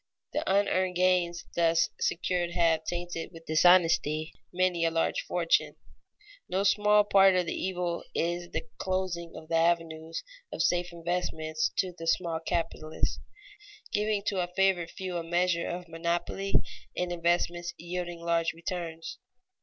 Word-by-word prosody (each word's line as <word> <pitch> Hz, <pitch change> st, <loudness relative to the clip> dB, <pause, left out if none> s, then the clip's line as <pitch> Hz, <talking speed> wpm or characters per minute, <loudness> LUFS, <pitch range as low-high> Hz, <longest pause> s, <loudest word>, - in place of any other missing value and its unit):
The -, -, 0 dB
unearned 185 Hz, -2 st, +2 dB
gains 180 Hz, -1 st, +2 dB
thus 170 Hz, 0 st, +3 dB
secured 175 Hz, 0 st, 0 dB
have 165 Hz, -2 st, +2 dB
tainted 175 Hz, -1 st, -4 dB
with 165 Hz, -1 st, -13 dB
dishonesty 160 Hz, -2 st, +4 dB, 0.2 s
many 180 Hz, -1 st, +1 dB
a 165 Hz, -, +4 dB
large 165 Hz, 0 st, 0 dB
fortune. 170 Hz, -2 st, +1 dB, 0.7 s
No 190 Hz, +2 st, +1 dB
small 210 Hz, +1 st, +5 dB
part 195 Hz, -2 st, +6 dB
of 180 Hz, -1 st, +2 dB
the -, -, -2 dB
evil 180 Hz, -2 st, -2 dB
is 175 Hz, +1 st, -1 dB
the -, -, -3 dB
closing 185 Hz, -3 st, -2 dB
of 160 Hz, -, -10 dB
the 165 Hz, 0 st, +1 dB
avenues 165 Hz, -1 st, 0 dB, 0.3 s
of -, -, -1 dB
safe 175 Hz, 0 st, +1 dB
investment 165 Hz, -2 st, -3 dB, 0.2 s
to 185 Hz, -2 st, 0 dB
the 165 Hz, -1 st, -7 dB
small 165 Hz, -1 st, +1 dB
capitalists, 165 Hz, -1 st, -2 dB, 0.7 s
giving 210 Hz, -1 st, +1 dB
to 195 Hz, -2 st, -1 dB
a 175 Hz, -, -1 dB
favored 180 Hz, -1 st, +1 dB
few 185 Hz, -2 st, -5 dB
a 170 Hz, -, -3 dB
measure 175 Hz, 0 st, +1 dB
of 175 Hz, 0 st, -5 dB
monopoly 170 Hz, +4 st, -2 dB, 0.4 s
in 180 Hz, 0 st, -1 dB
investments 175 Hz, 0 st, 0 dB
yielding 175 Hz, 0 st, -5 dB
large 170 Hz, -1 st, +1 dB
returns. 165 Hz, -1 st, -5 dB
175 Hz, 140 wpm, -29 LUFS, 165-180 Hz, 0.7 s, part